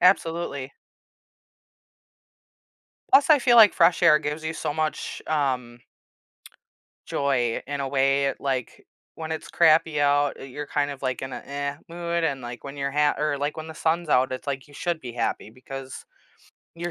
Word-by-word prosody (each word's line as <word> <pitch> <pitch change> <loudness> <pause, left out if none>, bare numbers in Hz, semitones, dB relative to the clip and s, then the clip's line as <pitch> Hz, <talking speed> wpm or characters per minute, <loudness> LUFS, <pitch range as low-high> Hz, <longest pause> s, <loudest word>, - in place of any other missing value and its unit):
Absolutely. 165 -7 +1 2.4
Plus, 285 +3 +5
I 300 - +8
feel 240 -2 +4
like 220 -3 +9
fresh 170 +1 +3
air 160 -3 +7
gives 150 +1 -4
you 160 - -2
so 155 - -3
much, 155 0 -3
um 130 -6 -1 1.3
joy 125 -5 0
in 140 +1 -4
a 135 - -2
way, 135 0 +2
like, 130 -3 -3 0.3
when 160 0 -5
it's 160 - -6
crappy 160 -2 +4
out, 145 0 +2
uh, - - -10
you're 140 +2 -7
kind 145 0 -1
of 140 -2 -8
like 130 -1 -2
in 130 0 -5
an - - -6
"eh" 140 0 -3
mood, 170 0 -2
and, 140 -5 -1
like, 120 0 -8
when 140 0 -8
you're 140 0 -2
ha 145 +1 +2
or 150 -1 0
like 145 +2 -2
when 155 0 -6
the 160 - -9
sun's 165 0 -1
out, 130 -1 +3
it's, 130 - -6
like, 135 0 -4
you 145 - -17
should 170 +1 -2
be 125 -4 -7
happy 115 - -2
because 130 +2 -9 0.7
you're 170 +1 -4
145 Hz, 175 wpm, -25 LUFS, 135-160 Hz, 2.4 s, like